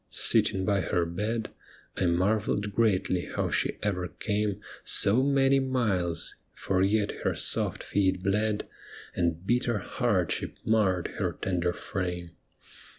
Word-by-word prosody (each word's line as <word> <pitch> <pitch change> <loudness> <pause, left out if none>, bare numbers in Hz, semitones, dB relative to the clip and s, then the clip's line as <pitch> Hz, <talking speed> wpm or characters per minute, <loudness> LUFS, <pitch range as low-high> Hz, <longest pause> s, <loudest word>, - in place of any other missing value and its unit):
Sitting 95 -1 +2
by 100 -1 +2
her 85 0 0
bed, 105 +6 -3 0.4
I 90 - +1
marvelled 100 +3 +1
greatly 95 -5 +1
how - - -2
she - - 0
ever 90 -4 -1
came 105 0 -2 0.2
So 105 +6 +3
many 135 0 +3
miles, 105 -11 0 0.2
for 95 -1 0
yet 100 +2 +1
her - - +1
soft - - +1
feet 95 -2 0
bled, 105 +2 0 0.5
And 85 0 -1
bitter 120 0 +1
hardship 100 -3 -1
marred 100 -5 +2
her - - 0
tender 90 -2 -1
frame. 90 -2 -4
100 Hz, 125 wpm, -28 LUFS, 90-110 Hz, 0.5 s, So